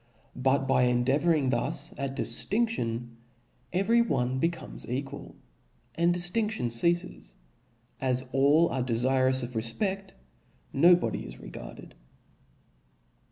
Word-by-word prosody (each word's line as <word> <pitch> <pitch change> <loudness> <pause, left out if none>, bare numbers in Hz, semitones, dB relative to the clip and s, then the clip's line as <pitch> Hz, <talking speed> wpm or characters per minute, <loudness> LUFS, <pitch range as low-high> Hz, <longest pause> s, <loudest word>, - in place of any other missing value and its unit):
But 135 +1 +1
by 125 - +3
endea 125 +3 +1
vouring 155 -6 +1
thus 120 0 -1
at 135 -1 -4
diftinftion, 120 - 0 0.5
every 210 +6 +2
one 130 - -1
becomes 165 -4 -3
equal, 135 +3 -6 0.6
and 170 +4 +1
dlftinftion 180 - +1
ceafes; 170 +9 -1 0.6
as 130 -1 0
all 145 +5 +4
arc 130 -1 -2
defirous 130 +2 +1
of 120 - -5
refpecl, 190 - -2 0.6
no 170 +6 +6
body 175 - -3
is - - -11
regarded. - - -11
135 Hz, 110 wpm, -28 LUFS, 125-175 Hz, 0.6 s, no